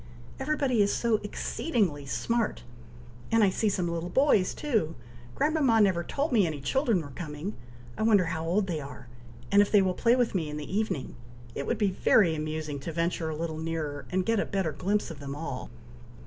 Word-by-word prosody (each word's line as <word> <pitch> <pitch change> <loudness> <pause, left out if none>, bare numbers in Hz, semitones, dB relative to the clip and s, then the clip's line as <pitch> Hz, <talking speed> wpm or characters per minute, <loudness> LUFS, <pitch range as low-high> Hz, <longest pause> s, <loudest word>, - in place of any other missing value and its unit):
Everybody 265 -4 +1
is 200 - +3
so 230 -2 +2
exceedingly 205 - -2
smart! 230 - -1 0.7
and 225 -1 +5
I 195 - +4
see 215 +3 +1
some 185 -3 -1
little 170 +1 -3
boys 235 -5 +3
too! 220 - 0 0.4
Grandmama 290 -7 +3
never 190 -5 +3
told 285 - -2
me 210 -7 +4
any 155 -3 -4
children 220 - +1
were 145 - -9
coming! 155 +6 -6 0.4
I - - -6
wonder 210 -4 +4
how 165 -1 -3
old 185 +5 +1
they 170 -5 -2
are, 140 -3 -10 0.4
and 200 0 +7
if 205 - +1
they 205 -2 +6
will 185 -1 +1
play 235 +6 +3
with 245 -2 +1
me 165 -6 -1
in 150 - -5
the 150 +5 -5
evening! 210 -10 -2 0.4
It 140 - -4
would 235 - 0
be 205 -3 +2
very 180 -2 +4
amusing 155 -1 -3
to 155 +5 -5
venture 165 0 -1
a 155 - -3
little 160 0 -4
nearer, 160 -3 -4
and 185 0 0
get 225 -2 +2
a - - +1
better 190 -5 -1
glimpse 200 +3 -1
of 155 - -9
them 140 -1 -6
all!" 145 -4 -5
185 Hz, 200 wpm, -28 LUFS, 155-220 Hz, 0.7 s, and